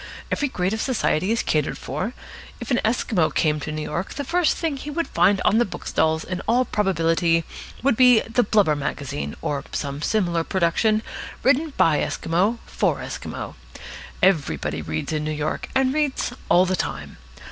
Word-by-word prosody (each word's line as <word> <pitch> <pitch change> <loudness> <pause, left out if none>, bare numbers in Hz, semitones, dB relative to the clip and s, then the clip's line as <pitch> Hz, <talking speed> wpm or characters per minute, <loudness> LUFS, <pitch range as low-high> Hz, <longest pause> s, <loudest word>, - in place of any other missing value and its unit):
Every 290 - +1
grade 185 -6 -1
of 220 - -2
society 205 - +1
is 230 - +1
catered 150 -2 0
for. 155 - -4 0.5
If - - -6
an 245 - +3
Esquimau 215 -6 +1
came 150 -1 +1
to 150 - -5
New 155 0 -3
York, 175 +6 -4
the 285 - -3
first 340 +3 +1
thing 325 -4 -1
he 285 - -7
would 330 +3 -2
find 200 -1 +3
on 220 - +4
the - - +5
bookstalls 160 -6 -1
in 185 0 -4
all 250 +2 +3
probability 165 -5 +1 0.4
would 270 -3 +3
be 250 -2 +6
the 230 +2 +1
Blubber 205 -8 +3
Magazine, 145 0 -4
or 140 -1 -2
some 140 0 -3
similar 175 -3 +1
production 195 +6 +1 0.4
written 285 +5 +3
by 150 -3 +4
Esquimaux 190 +8 0
for - - 0
Esquimaux. - - -6 0.7
Everybody 80 - +1
reads 80 - -3
in 155 -1 -1
New 155 - -2
York, 155 0 -3
and 265 0 +3
reads 290 -4 0 0.2
all 175 +2 +6
the 185 0 0
time. - - -4
185 Hz, 170 wpm, -23 LUFS, 155-240 Hz, 0.7 s, be